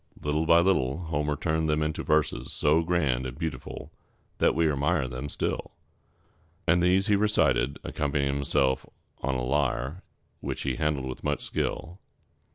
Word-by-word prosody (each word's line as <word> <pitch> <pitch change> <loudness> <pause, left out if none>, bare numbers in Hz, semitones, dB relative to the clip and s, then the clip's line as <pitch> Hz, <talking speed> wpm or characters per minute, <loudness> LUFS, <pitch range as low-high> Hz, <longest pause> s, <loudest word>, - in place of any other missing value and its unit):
Little 75 +2 -1
by 85 +1 +7
little 70 -8 +2
Homer 75 -3 -1
turned 80 +1 0
them 75 0 +2
into 75 0 -2
verses 75 -2 0
so 75 +3 +3
grand 75 -7 0
and 65 +1 -8
beautiful 80 -6 -5 0.5
that - - +3
we 80 0 +3
admire 70 0 +1
them 65 +3 -5
still; - - -3 0.9
and 85 - +4
these 90 +2 +3
he 105 -2 +3
recited, 100 -10 +2
accompanying 70 -1 -1
himself 65 -1 +1 0.4
on 65 0 -1
a 65 - -1
lyre, 70 +3 0 0.4
which - - -4
he 65 -3 -1
handled 75 -3 0
with 65 -1 -6
much 75 -2 -1
skill. 90 +5 -3
75 Hz, 155 wpm, -27 LUFS, 65-80 Hz, 0.9 s, by